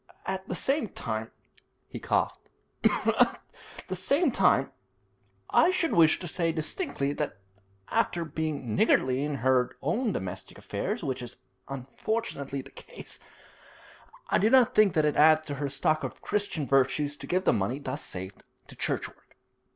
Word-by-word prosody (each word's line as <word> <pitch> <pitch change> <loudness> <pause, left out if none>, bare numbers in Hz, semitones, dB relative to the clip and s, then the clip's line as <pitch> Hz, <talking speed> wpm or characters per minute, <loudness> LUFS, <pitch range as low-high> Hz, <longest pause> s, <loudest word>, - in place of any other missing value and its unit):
At 190 0 -3
the 180 - -2
same 275 - 0
time' 110 -1 -4 0.6
he - - -7
coughed - - -1 0.3
'at - - +3 0.5
the 185 - -3
same 280 - +2
time, 160 - +3 0.8
I 335 - +5
should 360 -3 +1
wish 160 -2 +5
to 180 - -6
say 165 0 0
distinctly 155 - -1
that 145 -5 -3 0.5
after 170 -1 0
being 155 -6 -3
niggardly 130 +4 +3
in 150 -1 -2
her 130 -1 +3
domestic 155 - -2
affairs, - - -3
which 130 -2 -2
is 120 - -7 0.3
unfortunately 140 - -4
the 135 - -14
case, - - -10 1.1
I - - +4
do 215 - +3
not 255 -1 +5
think 205 -6 +4
it 155 - +4
adds 155 +1 +5
to 145 - -4
her 140 - -1
stock 155 +3 0
of - - -5
Christian 200 -8 -1
virtues 135 +2 +2
to - - -9
give 185 +1 +1
the - - +4
money 105 +6 0
thus 145 +1 -5
saved 95 +1 -7 0.3
to - - -11
church - - -1
work.' - - -22
150 Hz, 150 wpm, -28 LUFS, 135-185 Hz, 1.1 s, I